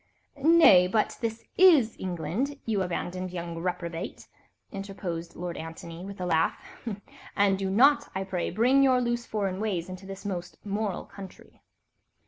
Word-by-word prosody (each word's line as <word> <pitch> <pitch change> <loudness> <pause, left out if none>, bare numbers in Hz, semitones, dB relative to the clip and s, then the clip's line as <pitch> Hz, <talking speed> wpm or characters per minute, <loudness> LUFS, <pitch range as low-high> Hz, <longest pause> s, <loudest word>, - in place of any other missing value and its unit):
"Nay, 300 - +7
but 215 +3 +1
this 225 -1 -3 0.2
is 310 -12 +6
England, 185 - -2
you 215 -4 0
abandoned 185 0 -3
young 170 -2 -5
reprobate," 170 0 -4 0.4
interposed 195 -4 -6
Lord 175 0 -5
Antony 165 +1 -8
with 200 0 -8
a 180 - -2
laugh, 160 -2 +2 0.8
"and 195 -1 +3
do 195 -1 -1
not, 270 +9 +4
I 190 - -1
pray, 185 -2 -2
bring 250 +8 +3
your 260 -2 +5
loose 240 -1 -1
foreign 195 -3 -2
ways 190 -5 -2
into 185 +1 -8
this 195 +1 -8
most 180 -3 -5
moral 205 -1 -2
country." 195 -2 -13
195 Hz, 145 wpm, -28 LUFS, 175-220 Hz, 0.8 s, Nay